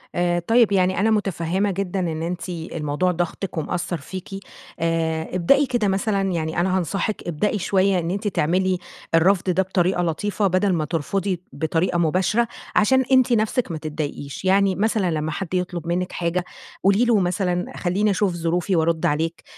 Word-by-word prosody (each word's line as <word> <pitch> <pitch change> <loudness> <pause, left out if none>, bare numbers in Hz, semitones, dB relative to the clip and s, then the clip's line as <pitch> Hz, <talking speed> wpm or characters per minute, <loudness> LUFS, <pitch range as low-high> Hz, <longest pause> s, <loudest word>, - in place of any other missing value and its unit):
آآ 175 0 +1
طيب 225 +5 +3
يعني 185 -1 +2
أنا 220 +2 +3
متفهمة 195 -1 0
جدًا 195 0 -2
إن 160 -3 -2
أنتِ 175 +2 -4
الموضوع 165 0 -2
ضاغطِك 175 +1 -3
ومأثّر 175 +2 -2
فيكِ. 185 +5 -8 0.5
آآ 165 -1 -1
ابدئي 275 +12 +4
كده 240 -5 0
مثلًا 195 +1 0
يعني 160 -1 -2
أنا 185 +1 +2
هانصحِك 195 +4 -2
ابدئي 205 +6 0
شوية 190 0 +2
إن 170 +1 -2
أنتِ 200 +2 -2
تعملي 185 +1 +1 0.4
الرفض 185 +3 +3
ده 185 +2 +2
بطريقة 185 -1 +1
لطيفة، 200 +5 0
بَدَل 185 +1 +2
ما 155 -2 0
ترفضي 175 +4 -2
بطريقة 160 +4 0
مباشرة، 185 +8 +2 0.3
عشان 260 +5 +4
أنتِ 260 -1 +5
نفسِك 220 0 +1
ما 165 - -3
تضايقيش. 150 0 -5
يعني 195 0 +3
مثلًا 205 -2 +1
لمّا 155 0 -2
حد 185 +3 -5
يطلب 180 -2 -2
منِّك 180 +1 -1
حاجة 175 +1 -1 0.4
قولي 200 +5 +4
له 230 -3 +4
مثلًا 180 -1 0
خلّيني 200 +4 +1
أشوف 195 -1 +1
ظروفي 175 +2 0
وأرد 160 0 +1
عليك، 160 +3 -1
180 Hz, 160 wpm, -22 LUFS, 165-195 Hz, 0.5 s, أنتِ